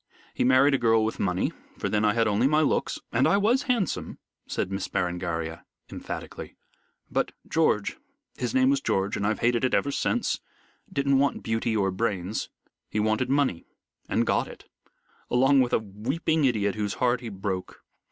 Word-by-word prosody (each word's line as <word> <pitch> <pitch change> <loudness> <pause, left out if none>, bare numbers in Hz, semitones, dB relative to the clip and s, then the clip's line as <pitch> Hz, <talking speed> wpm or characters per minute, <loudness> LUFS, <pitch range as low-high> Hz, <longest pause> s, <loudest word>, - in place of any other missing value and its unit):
He - - 0
married 130 +3 +5
a 135 - +2
girl 115 -1 +3
with 110 - -3
money, 90 -1 0 0.3
for - - -2
then 105 0 +1
I 105 -1 +3
had 115 -1 +3
only 105 +5 +3
my 150 +2 +3
looks, 155 - 0
and 130 +5 +3
I 170 - +4
was 240 +7 +2
handsome," 235 -7 -1 0.3
said 95 - -2
Miss 95 0 -2
Berengaria, 85 -2 -2 0.3
emphatically; - - -7 0.6
"but - - 0
George 150 -10 +1 0.4
his - - -3
name 260 +1 +5
was 280 0 +1
George 95 - 0
and 100 - -1
I've 110 - -1
hated 120 0 +2
it 130 - +2
ever 140 - +1
since - - 0 0.5
didn't 140 -1 +2
want 140 0 +1
beauty 115 0 0
or 95 -2 +1
brains. 95 -1 -2 0.4
He 105 - -1
wanted 110 +4 +1
money, 135 -11 +1 0.4
and - - +2
got - - +1
it, - - -13 0.6
along 135 +2 +4
with 125 - 0
a - - +4
weeping 130 - -1
idiot 105 -6 +1
whose 105 -1 -2
heart 125 -1 +1
he 120 - -5
broke. 95 -2 -5
115 Hz, 175 wpm, -26 LUFS, 100-140 Hz, 0.6 s, married